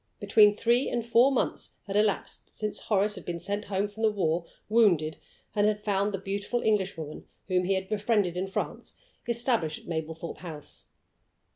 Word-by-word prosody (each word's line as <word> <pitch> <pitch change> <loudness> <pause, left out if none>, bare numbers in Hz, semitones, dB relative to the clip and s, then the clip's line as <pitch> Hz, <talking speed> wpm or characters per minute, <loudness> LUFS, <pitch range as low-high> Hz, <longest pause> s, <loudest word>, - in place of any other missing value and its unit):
Between 210 -1 +6
three 235 +5 +2
and 235 -2 -2
four 235 +3 +5
months 265 - -1
had 200 -1 -5
elapsed 210 -1 0
since 210 -1 -3
Horace 205 0 +1
had 185 -4 -6
been 175 -1 -4
sent 200 +5 -3
home 200 0 0
from 205 +2 -10
the 220 - +5
war, 170 -5 0 0.2
wounded, 185 -9 +3 0.4
and 210 -1 +3
had 210 0 0
found 200 0 +1
the 195 - -2
beautiful 200 +5 -2
Englishwoman 190 -8 -1 0.2
whom 180 -1 +1
he 195 +1 +2
had 190 0 -2
befriended 205 -3 +1
in 185 +2 -2
France 190 - -4 0.3
established 230 - 0
at - - -19
Mablethorpe 160 0 -4
House. 160 -5 -10
200 Hz, 170 wpm, -28 LUFS, 180-215 Hz, 0.4 s, Between